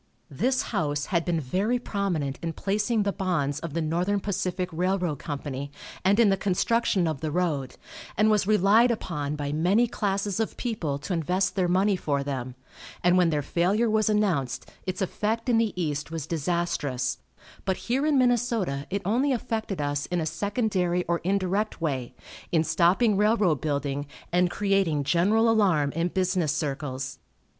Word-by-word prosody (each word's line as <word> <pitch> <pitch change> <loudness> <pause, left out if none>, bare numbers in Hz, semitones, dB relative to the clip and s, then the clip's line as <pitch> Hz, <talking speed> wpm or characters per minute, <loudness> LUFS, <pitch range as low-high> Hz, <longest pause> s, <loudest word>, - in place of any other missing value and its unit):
This 255 - +1
house 145 -2 0
had 170 -1 +2
been 175 -3 0
very 190 - 0
prominent 180 - -2
in 165 -1 -3
placing 210 +5 0
the 200 - 0
bonds 155 -7 -1
of 165 -1 -6
the 165 - 0
Northern 175 +6 0
Pacific 185 -2 -2
Railroad 180 -3 0
Company, 140 -2 -5 0.3
and 200 +4 +3
in 225 -3 +6
the 195 - +2
construction 195 0 +1
of 155 -4 -3
the 155 - -1
road, 150 -5 -1 0.4
and 215 +2 +4
was 210 -2 +2
relied 215 +3 +5
upon 150 -10 -2
by 145 -1 -3
many 180 +10 +3
classes 200 -3 -1
of 225 - -2
people 180 - -2
to 140 +6 -4
invest 180 +3 0
their 185 -2 +2
money 190 +3 +3
for 145 -6 -1
them, 130 -3 -4 0.5
and 180 0 +4
when 180 -2 +4
their 150 -2 0
failure 200 +10 +1
was 215 0 +2
announced, 185 -12 0 0.2
its 185 +1 -1
effect 220 +5 -2
in 230 -2 +4
the 225 -2 +1
East 150 -3 -2
was 165 -3 -4
disastrous, 150 -6 -1 0.4
but 190 -1 0
here 255 +4 -1
in 300 -2 +3
Minnesota 235 - +1
it 200 +1 -2
only 250 +8 +2
affected 220 -6 -2
us 145 0 -1
in 175 - -1
a 160 - -1
secondary 180 0 0
or 170 0 0
indirect 195 +3 -1
way, 130 -6 -2 0.4
in 160 -2 +3
stopping 180 +7 +3
railroad 210 - +3
building 145 -1 -2 0.2
and 180 +1 +3
creating 195 -7 +1
general 200 +10 +3
alarm 185 -11 +3
in 165 +3 0
business 185 -3 0
circles. 135 -4 -3
180 Hz, 165 wpm, -26 LUFS, 150-205 Hz, 0.5 s, in